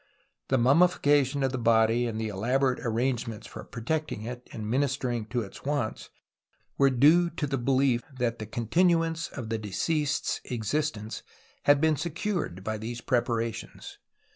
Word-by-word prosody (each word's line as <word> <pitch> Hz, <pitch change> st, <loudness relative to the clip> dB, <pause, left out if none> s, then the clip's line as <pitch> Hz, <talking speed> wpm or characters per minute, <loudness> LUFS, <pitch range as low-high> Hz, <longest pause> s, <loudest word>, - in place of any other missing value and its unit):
The 130 Hz, -, +2 dB
mummifica 145 Hz, +2 st, +4 dB
tion 135 Hz, +2 st, -3 dB
of 135 Hz, -, +1 dB
the 130 Hz, -, -3 dB
body 115 Hz, +1 st, +3 dB
and 110 Hz, -1 st, -3 dB
the 110 Hz, -1 st, -2 dB
elaborate 125 Hz, +6 st, +1 dB
arrange 120 Hz, +1 st, 0 dB
ments 110 Hz, -1 st, -7 dB
for -, -, -9 dB
protecting 135 Hz, 0 st, -3 dB
it 125 Hz, +2 st, -7 dB
and 110 Hz, -2 st, -6 dB
ministering 125 Hz, -2 st, 0 dB
to 120 Hz, 0 st, -1 dB
its 95 Hz, -, -11 dB
wants 140 Hz, -6 st, -2 dB, 0.7 s
were 140 Hz, 0 st, +4 dB
due 155 Hz, +7 st, +5 dB
to 165 Hz, -2 st, -3 dB
the 135 Hz, -2 st, -2 dB
belief 130 Hz, -1 st, +2 dB, 0.2 s
that 120 Hz, -2 st, -1 dB
the 110 Hz, -, -5 dB
continu 165 Hz, -, +2 dB
ance 165 Hz, 0 st, -3 dB
of 120 Hz, -5 st, -7 dB
the 115 Hz, -1 st, -1 dB
deceased's 145 Hz, -, -1 dB
existence 115 Hz, -1 st, -2 dB, 0.4 s
had 145 Hz, 0 st, +6 dB
been 155 Hz, 0 st, +3 dB
secured 165 Hz, -, -3 dB
by 110 Hz, +1 st, -3 dB
these 115 Hz, +2 st, -5 dB
preparations. 115 Hz, -2 st, -2 dB
125 Hz, 160 wpm, -28 LUFS, 115-145 Hz, 0.7 s, had